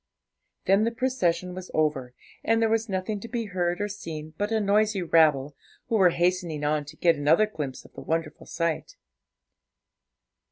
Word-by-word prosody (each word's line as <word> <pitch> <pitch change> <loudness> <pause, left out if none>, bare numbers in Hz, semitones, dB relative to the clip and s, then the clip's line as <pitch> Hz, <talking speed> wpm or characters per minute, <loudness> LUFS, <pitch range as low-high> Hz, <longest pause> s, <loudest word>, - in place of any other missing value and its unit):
Then 195 +2 +4
the 230 - +2
procession 185 -8 -1
was 185 0 -8
over, 140 -5 0 0.3
and 225 0 +2
there 225 -1 +2
was 225 0 0
nothing 190 +2 -2
to 230 - -8
be 230 -1 -3
heard 175 -3 -1
or 205 - -1
seen 160 -6 -7
but 205 +5 -2
a 220 - +2
noisy 205 -1 +2
rabble, 150 -4 +3 0.3
who 230 - +1
were 190 -4 +6
hastening 175 -3 0
on 150 0 0
to 150 +3 -11
get 170 +1 +3
another 155 +8 +4
glimpse 150 -11 -6
of - - -17
the - - -9
wonderful 160 -1 -3
sight. 170 - -2
180 Hz, 170 wpm, -26 LUFS, 155-210 Hz, 0.3 s, were